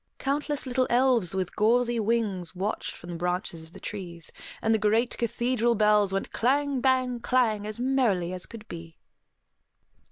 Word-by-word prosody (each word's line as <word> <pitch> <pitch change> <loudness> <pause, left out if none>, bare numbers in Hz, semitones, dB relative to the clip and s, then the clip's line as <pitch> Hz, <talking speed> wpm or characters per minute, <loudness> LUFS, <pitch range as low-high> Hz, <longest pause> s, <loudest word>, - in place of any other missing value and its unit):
Countless 285 +1 -1
little 255 0 +1
elves 240 -7 +2
with 185 -2 -2
gauzy 235 +2 +2
wings 210 -6 0
watched 200 +4 -2
from 175 - -10
the - - -5
branches 180 -1 -2
of 160 - -16
the - - -11
trees; 175 -5 -7 0.3
and 225 - +1
the 220 - +2
great 220 +4 +2
cathedral 240 0 0
bells 210 -2 +4
went 195 0 -2
clang, 280 +2 +1
bang, 255 -2 +2
clang, 230 -4 +1
as 215 +1 -2
merrily 235 -9 +1
as 180 -1 -4
could 220 -2 -11
be. 165 -1 -9
220 Hz, 160 wpm, -27 LUFS, 190-250 Hz, 0.3 s, bells